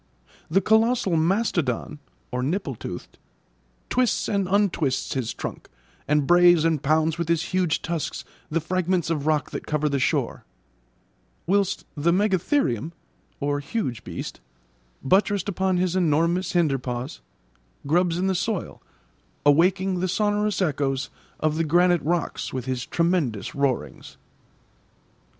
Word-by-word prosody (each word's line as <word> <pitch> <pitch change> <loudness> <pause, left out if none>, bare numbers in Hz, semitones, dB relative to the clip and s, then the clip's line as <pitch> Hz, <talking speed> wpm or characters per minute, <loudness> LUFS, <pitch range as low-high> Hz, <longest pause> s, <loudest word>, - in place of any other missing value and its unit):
The 190 +5 +3
colossal 220 -3 +3
mastodon 165 - 0 0.3
(nipple 140 +5 -1
toothed) 90 -6 -8 0.7
twists 250 -1 +1
and 200 -3 0
untwists 185 -9 +1
his 125 -4 -2
trunk, - - -7 0.4
and 150 0 +2
brays 175 0 +6
and 160 -4 +1
pounds 155 +2 +1
with 170 -1 -2
his 165 -1 +2
huge 180 -4 +1
tusks 165 -1 -3 0.2
the 165 - 0
fragments 180 0 0
of 150 -2 -2
rock 155 -2 +1
that - - -6
cover 150 0 0
the 140 -2 0
shore; 125 - 0 1.0
whilst 195 +1 +1
the 160 +3 +2
megatherium 185 - +1 0.7
(huge 140 - -3
beast), - - -6 0.6
buttressed 195 +5 +2
upon 190 -1 0
his 180 0 0
enormous 170 +2 +1
hinder 155 -6 +2
paws, 125 - -5 0.6
grubs 170 +3 +2
in 185 - 0
the 190 - +2
soil, 200 +1 -3 0.6
awaking 185 +5 +3
the 185 - 0
sonorous 210 +1 +1
echoes 140 -3 -1 0.3
of 155 0 0
the 165 - +2
granite 175 +1 +3
rocks 170 0 -2
with 130 -2 -4
his 130 -1 -3
tremendous 165 - 0
roarings. 140 -3 -2
170 Hz, 125 wpm, -24 LUFS, 145-185 Hz, 1.0 s, brays